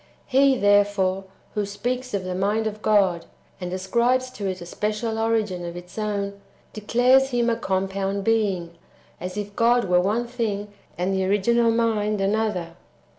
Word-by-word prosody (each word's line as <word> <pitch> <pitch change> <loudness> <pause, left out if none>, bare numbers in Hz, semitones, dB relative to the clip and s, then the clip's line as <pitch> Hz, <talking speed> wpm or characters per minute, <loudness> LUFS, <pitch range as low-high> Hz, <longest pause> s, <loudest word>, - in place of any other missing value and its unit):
He, 270 0 +4
there 205 -1 +5
fore, 195 -1 -1 0.3
who 210 - 0
speaks 245 +4 -3
of 195 - -2
the 185 0 -3
mind 205 +4 0
of 215 -1 -4
God, 195 -6 +2 0.3
and 180 -1 -5
ascribes 240 +7 +1
to 205 -5 -5
it 185 -1 -4
a 175 - -8
special 215 +4 -2
origin 220 -5 0
of 170 0 -6
its 175 0 -11
own, 200 -2 -3 0.3
declares 250 +5 +3
Him 240 -2 +1
a - - +1
compound 195 -1 -2
Being, 195 -6 +1 0.5
as 180 +2 -6
if 205 -1 -5
God 240 0 +3
were 180 -1 +3
one 215 +6 0
thing, 220 -4 -3 0.3
and 180 +2 0
the 190 0 0
original 230 +4 +3
Mind 220 -2 +1
another. 195 -4 -1
205 Hz, 165 wpm, -24 LUFS, 190-230 Hz, 0.5 s, there